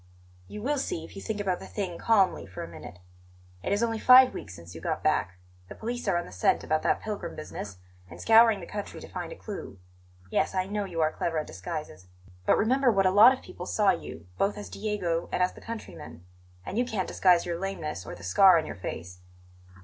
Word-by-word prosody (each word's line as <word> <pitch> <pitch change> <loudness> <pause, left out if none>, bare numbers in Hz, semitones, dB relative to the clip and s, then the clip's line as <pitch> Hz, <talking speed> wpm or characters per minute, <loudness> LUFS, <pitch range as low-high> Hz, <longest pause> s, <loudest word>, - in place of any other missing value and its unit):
"You 210 - -8
will 290 +2 0
see 165 -10 -3
if - - -14
you 195 - -7
think 215 0 -4
about 190 -3 -1
the - - -10
thing 185 -5 -4
calmly 200 - +2
for 95 - -7
a - - -7
minute. 85 +1 -11 0.6
It - - -3
is 205 +3 +2
only 225 -1 0
five 255 +2 +8
weeks 95 -2 -8
since 85 0 -12
you 80 - -9
got - - -3
back; 90 +1 +1 0.3
the - - -9
police 240 +1 -5
are 185 -3 +2
on 175 - -2
the - - -12
scent 90 0 +1
about 155 0 0
that - - +1
pilgrim 205 -5 -5
business, 105 -10 -7 0.3
and 85 0 -11
scouring 225 - +5
the - - -7
country 205 +3 -6
to - - -10
find - - -6
a - - -7
clue. 210 - -8 0.5
Yes, 155 +4 0
I 185 0 +1
know 205 +1 -2
you 170 -4 -3
are 155 0 +2
clever 165 0 -2
at 155 - -1
disguises; 90 - -7 0.4
but - - +5
remember 255 +3 +3
what 195 -3 +2
a 185 - +4
lot 210 +6 +8
of 260 - -4
people 180 - -9
saw 205 -2 +3
you, 85 - -6
both 200 +1 +1
as 205 - -7
Diego 195 -6 -2
and 180 - +1
as 180 - 0
the - - -14
countryman; 85 - -9 0.4
and 215 - -3
you - - +3
can't 215 -7 -2
disguise 180 -2 +3
your 170 -1 -3
lameness 160 - -4
or - - -8
the 90 - -13
scar 175 - +6
on 160 - 0
your - - -7
face." 90 0 -7
185 Hz, 230 wpm, -28 LUFS, 150-210 Hz, 0.6 s, five